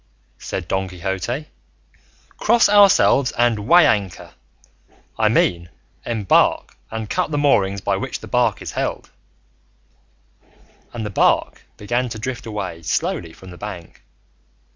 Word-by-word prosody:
said 90 -3 -5
Don 95 +2 -1
Quixote, 95 - -4 0.9
"cross 230 +2 +3
ourselves 200 -10 +5
and 115 -3 0
weigh 175 +2 +7
anchor; 100 -4 -1 0.8
I - - +2
mean, 85 0 +1 0.4
embark 110 -5 +1
and 110 -1 -5
cut 180 +5 -1
the 150 - -2
moorings 100 -9 +2
by - - 0
which - - -5
the - - -11
bark - - 0
is - - -6
held;" - - -4 1.8
and 115 -2 -5
the 105 - -5
bark - - +1 0.2
began 120 +4 -2
to 115 - -6
drift 125 +2 -5
away 95 -6 -5
slowly 80 +1 -2
from 95 +2 -14
the 90 - -13
bank. 100 -5 -9
105 Hz, 130 wpm, -20 LUFS, 95-125 Hz, 1.8 s, weigh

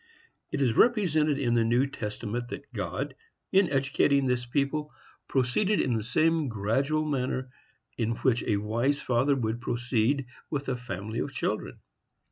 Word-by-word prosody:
It 140 - 0
is 120 -4 +2
represented 160 - +3
in 125 -4 +1
the 115 -1 +3
New 120 +4 +3
Testament 120 -1 -4
that 140 +1 -8
God, 120 +8 -3 0.4
in 190 -2 +4
educating 140 0 +2
this 125 -1 0
people, 145 +4 -1 0.4
proceeded 135 +11 +1
in 125 - +1
the 110 - 0
same 160 +7 +2
gradual 130 +8 0
manner 130 -3 -2 0.5
in 115 0 +1
which 125 -2 +3
a 105 - +2
wise 120 +7 0
father 130 +3 +2
would 115 -2 -2
proceed 120 +3 0 0.2
with 140 -2 -3
a 130 - 0
family 110 -2 -5
of - - -2
children. - - -3
130 Hz, 150 wpm, -28 LUFS, 115-145 Hz, 0.5 s, in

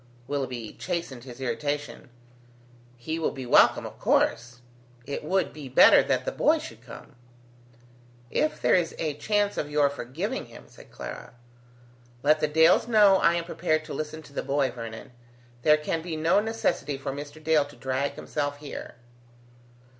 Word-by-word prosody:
Willoughby 130 -6 -4
chastened 165 -9 -4
his 125 -1 -10
irritation: 135 +3 -3 0.9
"He 160 +7 -4
will 160 - +1
be 130 -2 -7
welcome, 120 - +5
of - - -9
course. 120 +1 +1 0.4
It 140 - -5
would 190 +5 0
be 145 -3 -9
better 130 - +7
that - - -1
the - - -1
boy - - +3
should - - -9
come." - - -12 1.2
"If 310 - 0
there - - +2
is 175 -3 +2
a 155 -2 -2
chance 205 +6 0
of 145 - -2
your 145 -1 +2
forgiving 165 - -4
him," - - -13
said - - -17
Clara. - - -9 0.9
"Let 155 +2 +4
the 155 - +1
Dales 160 +7 +4
know 210 -4 +6
I 170 -2 +3
am 170 - -1
prepared 155 -2 -1
to 155 - -7
listen 155 +2 -5
to 140 - -16
the - - -2
boy, 140 0 0
Vernon. 115 -1 -8 0.5
There 150 +4 +5
can 155 +2 -2
be 165 -1 -5
no 160 +5 +3
necessity 215 -9 -1
for 135 0 -4
Mr. 145 +2 -8
Dale 155 -2 +3
to 145 - -14
drag 130 +2 -2
himself 145 -1 -3
here." 145 0 -8
150 Hz, 165 wpm, -26 LUFS, 135-165 Hz, 1.2 s, better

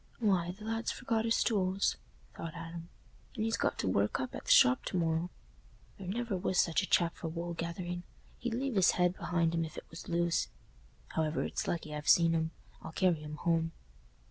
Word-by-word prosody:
"Why, 190 -6 +2
th' 185 +4 -7
lad's 225 +1 -1
forgot 230 -3 -1
his 230 - +3
tools," 195 -3 +1 0.4
thought 165 -2 -6
Adam, 165 0 -7 0.5
"and 220 -2 -1
he's 225 0 +1
got - - 0
to - - -1
work 100 +2 +1
up 130 - -3
at - - -7
the - - +1
shop 125 +1 +7
to - - -2
morrow. 165 0 +1 0.7
There 190 - -7
never 230 +2 -1
was 185 0 0
such 165 +1 +3
a 190 - -3
chap 170 -1 +3
for 165 - -4
wool 170 +1 -4
gathering; 175 +1 -4 0.4
he'd 240 -1 -2
leave 265 +1 -1
his 190 -4 +5
head 180 0 +3
behind 170 -3 0
him, 165 0 +1
if 160 - -7
it - - -7
was 165 - -9
loose. 170 0 +1 0.6
However, 160 0 0
it's - - -3
lucky 155 -3 -2
I've 150 0 -3
seen 165 -1 +6
'em; 160 -1 +1 0.3
I'll 160 - -8
carry 175 -4 +2
'em 150 0 -6
home." 165 +1 0
175 Hz, 200 wpm, -32 LUFS, 165-195 Hz, 0.7 s, shop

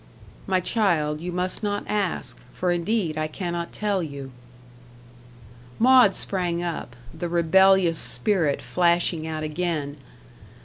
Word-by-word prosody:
"My 190 -1 +2
child, 170 -7 0
you 180 +1 -4
must 180 +1 -2
not 205 -1 -2
ask, 205 -4 -2 0.2
for 180 -1 0
indeed 175 -2 -1
I 155 - -1
cannot 170 +1 -4
tell 205 -3 -1
you." 140 -4 -7 1.5
Maud 250 -5 +6
sprang 175 -3 -1
up 165 -8 -5 0.2
the 170 +2 -4
rebellious 175 0 +4
spirit 175 -10 +1
flashing 170 -2 +1
out 155 -1 -4
again. 155 -2 -3
175 Hz, 120 wpm, -24 LUFS, 160-190 Hz, 1.5 s, Maud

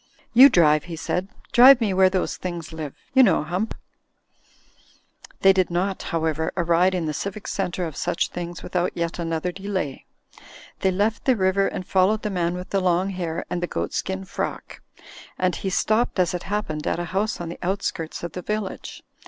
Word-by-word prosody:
"You 265 +4 +9
drive," 155 - +4
he 170 -2 -6
said, 180 +3 -2 0.2
"drive 255 +2 +8
me 215 -5 0
where 190 0 +5
those 185 -1 -1
things 170 -3 -6
live; 155 -3 -6 0.2
you 265 - +7
know, 195 -11 +4
Hump." 180 +8 -3 1.7
They 195 0 +7
did 185 -2 +1
not, 185 +3 -1
however, 160 -1 -1
arrive 175 +2 +3
in 175 -3 -1
the 155 - -2
civic 200 +6 -5
centre 180 -2 -2
of 160 -3 -6
such 170 - -1
things 175 -1 -6
without 180 0 -2
yet 170 +1 -2
another 165 +1 -2
delay. 190 -7 -4 0.7
They 190 - +2
left 205 +4 0
the 260 - +4
river 195 -1 +2
and 185 - -5
followed 195 +4 +2
the 210 - -2
man 175 -2 -1
with 180 0 -7
the 195 - +1
long 185 +1 +1
hair 170 -3 -4
and 175 - -3
the 175 - -1
goatskin 190 +2 -3
frock; - - -5 0.6
and 185 -1 +1
he 195 - -3
stopped 215 +5 +1
as 180 +1 +2
it 175 - -3
happened 160 -8 -2
at - - 0
a 175 - -3
house 210 +3 0
on 170 -1 -5
the 170 - -8
outskirts 180 -4 -3
of 175 - -4
the 180 - -6
village. 210 0 -5
185 Hz, 185 wpm, -23 LUFS, 170-195 Hz, 1.7 s, You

